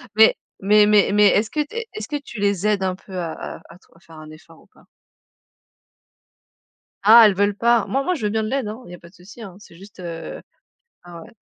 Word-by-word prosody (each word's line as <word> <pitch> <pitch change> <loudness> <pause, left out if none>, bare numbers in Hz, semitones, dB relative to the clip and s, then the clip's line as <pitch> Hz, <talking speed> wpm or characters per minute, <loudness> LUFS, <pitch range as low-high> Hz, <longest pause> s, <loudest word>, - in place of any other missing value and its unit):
Mais 220 0 +6 0.3
mais 210 +2 +4
mais 210 -1 +3
mais 210 0 +5
est-ce 215 +3 +1
que 305 - -2
tu 295 - -16
es 465 -1 -5
est-ce 215 - -7
que 295 - -5
tu 240 -6 -11
les 200 0 0
aides 205 -2 0
un 185 -1 -2
peu 190 -1 -11
à 170 -2 -4
à - - -9
à - - -15
trouv 180 - -29
à - - -22
faire 165 -2 -17
un 155 - -13
effort 160 +1 -17
ou - - -25
pas? - - -25 2.2
Ah 225 +2 +8
elles 210 - +4
veulent 205 +1 0
pas? 235 0 +2
Moi 270 +2 -1
moi 365 - -1
je 280 - -6
veux 210 - 0
bien 220 +1 -2
de 215 - -4
l'aide, 270 -5 -2
hein, 220 +4 -8
il 175 - -13
y - - -8
a - - -17
pas 170 - -16
de - - -28
souci, 195 +6 -15
hein, 195 -5 -10
c'est 190 - -17
juste, 195 +2 -16
heu 165 -2 -8 0.6
ah 170 -1 -12
ouais. - - -15
205 Hz, 255 wpm, -20 LUFS, 180-220 Hz, 2.2 s, Ah